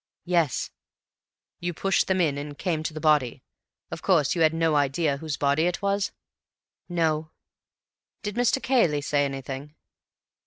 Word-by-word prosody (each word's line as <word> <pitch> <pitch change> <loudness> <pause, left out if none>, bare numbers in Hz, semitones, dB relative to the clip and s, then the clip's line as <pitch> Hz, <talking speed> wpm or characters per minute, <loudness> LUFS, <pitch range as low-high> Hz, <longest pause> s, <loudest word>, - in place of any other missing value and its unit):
"Yes." 170 -5 +1 0.9
"You 175 -1 -3
pushed 195 +3 +1
them 190 -1 +1
in 155 -5 +2
and 145 0 -7
came 165 -4 -1
to 155 - -3
the - - -4
body. 150 -6 +2 0.5
Of - - -6
course 165 -8 +3
you 170 - -1
had 160 -1 +5
no 165 -1 +1
idea 145 +1 +1
whose 150 -1 -4
body 145 +4 +2
it 180 +2 -3
was?" 200 0 0 0.8
"No." 160 -2 0 0.9
"Did 205 - -3
Mr. 245 +3 +2
Cayley 175 - +3
say 145 0 +1
anything?" 135 +2 -6
155 Hz, 150 wpm, -26 LUFS, 145-175 Hz, 0.9 s, had